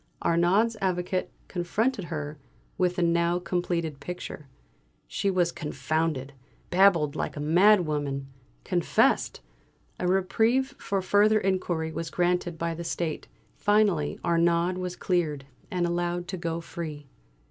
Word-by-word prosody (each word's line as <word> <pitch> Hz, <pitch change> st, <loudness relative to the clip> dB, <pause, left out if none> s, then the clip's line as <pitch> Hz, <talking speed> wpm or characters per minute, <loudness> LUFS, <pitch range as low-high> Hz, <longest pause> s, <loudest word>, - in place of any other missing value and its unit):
Arnaud's 185 Hz, +7 st, +3 dB
Avocat 185 Hz, 0 st, -1 dB, 0.2 s
confronted 200 Hz, +4 st, -1 dB
her 150 Hz, -3 st, -5 dB, 0.4 s
with 180 Hz, -2 st, +1 dB
the 180 Hz, -, +1 dB
now 170 Hz, +1 st, +2 dB
completed 170 Hz, -4 st, -2 dB
picture. 175 Hz, -3 st, -7 dB, 0.6 s
She 200 Hz, -, -1 dB
was 180 Hz, -3 st, +2 dB
confounded 150 Hz, -1 st, -2 dB, 0.4 s
babbled 175 Hz, -6 st, +4 dB
like -, -, -3 dB
a -, -, -3 dB
mad 180 Hz, +6 st, +5 dB
woman 145 Hz, -3 st, -2 dB, 0.4 s
confessed! -, -, +2 dB, 0.6 s
A 180 Hz, -, 0 dB
reprieve 225 Hz, +8 st, +2 dB
for 195 Hz, -1 st, -1 dB
further 210 Hz, +3 st, +4 dB
inquiry 180 Hz, -5 st, -1 dB
was 165 Hz, 0 st, -4 dB
granted 175 Hz, -1 st, 0 dB
by 165 Hz, +1 st, -1 dB
the 170 Hz, +1 st, -6 dB
State. 165 Hz, -1 st, -3 dB, 0.3 s
Finally 205 Hz, -8 st, +2 dB
Arnaud 170 Hz, +1 st, +3 dB
was 180 Hz, -1 st, -3 dB
cleared, 155 Hz, -8 st, -1 dB, 0.2 s
and 180 Hz, -1 st, 0 dB
allowed 175 Hz, 0 st, -1 dB
to 190 Hz, -, -2 dB
go 170 Hz, -1 st, -3 dB
free. 155 Hz, -3 st, -6 dB
175 Hz, 125 wpm, -27 LUFS, 160-185 Hz, 0.6 s, mad